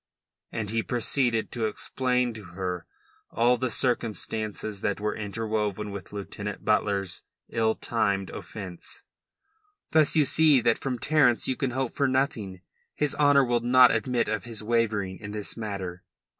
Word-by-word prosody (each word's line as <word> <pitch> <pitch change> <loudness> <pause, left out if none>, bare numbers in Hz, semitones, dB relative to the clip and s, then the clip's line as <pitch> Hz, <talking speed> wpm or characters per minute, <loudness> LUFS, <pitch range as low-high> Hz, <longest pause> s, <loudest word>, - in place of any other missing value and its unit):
And 105 -2 -3
he 115 0 +1
proceeded 120 -1 +1
to 115 -3 -1
explain 125 +2 0
to 110 -1 -9
her 90 -1 -5 0.4
all 120 +2 +3
the 130 0 -2
circumstances 110 -3 0
that 100 - -1
were 105 +1 -2
interwoven 105 -1 -3
with 100 -2 -8
Lieutenant 105 0 -6
Butler's 100 -4 +1 0.3
ill 110 -1 +1
timed 100 -4 0
offence. 95 -5 -7 0.9
"Thus 155 -1 +4
you 150 -2 +5
see 155 -1 +6
that 120 -1 +2
from 130 -2 -2
Terence 135 -3 +3
you 130 - 0
can 135 0 -1
hope 130 0 -2
for 140 - +1
nothing. 125 -8 -1 0.3
His 150 -2 +1
honour 145 -1 +5
will 120 -1 +1
not 125 +1 +6
admit 120 +2 0
of 110 -3 -2
his 115 -3 -3
wavering 105 -4 0
in 105 -1 -7
this 105 -1 -3
matter." 95 -5 -5
110 Hz, 150 wpm, -27 LUFS, 105-125 Hz, 0.9 s, see